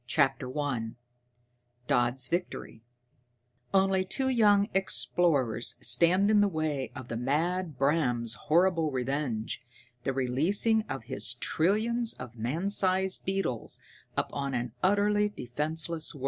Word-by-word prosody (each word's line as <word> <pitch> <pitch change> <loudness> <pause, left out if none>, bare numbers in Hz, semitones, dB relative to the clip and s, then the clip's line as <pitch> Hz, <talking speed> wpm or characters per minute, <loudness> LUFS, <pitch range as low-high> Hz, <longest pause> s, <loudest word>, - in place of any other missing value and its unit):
_] - - -19
[Sidenote: 130 -3 -1 2.7
Only 190 -1 +3
two 265 +8 -1
young 205 -5 +4
explorers 155 - 0
stand 175 - +3
in 210 -1 +5
the 205 - +4
way 155 -7 -2
of 130 -3 -8
the 115 - -5
mad 155 +6 -1
Bram's 125 -5 +1
horrible 165 +4 +2
revenge 130 -4 -3 0.4
the - - 0
releasing 155 - +2
of 135 -4 -4
his 125 -1 -2
trillions 220 - +1
of 120 - -9
man 145 - -2
sized 190 -1 +2
beetles 190 - -2 0.4
upon 140 -2 -2
an 120 -1 -2
utterly 205 +2 +2
defenseless 155 +2 -2
world. - - -10
155 Hz, 110 wpm, -29 LUFS, 130-190 Hz, 2.7 s, in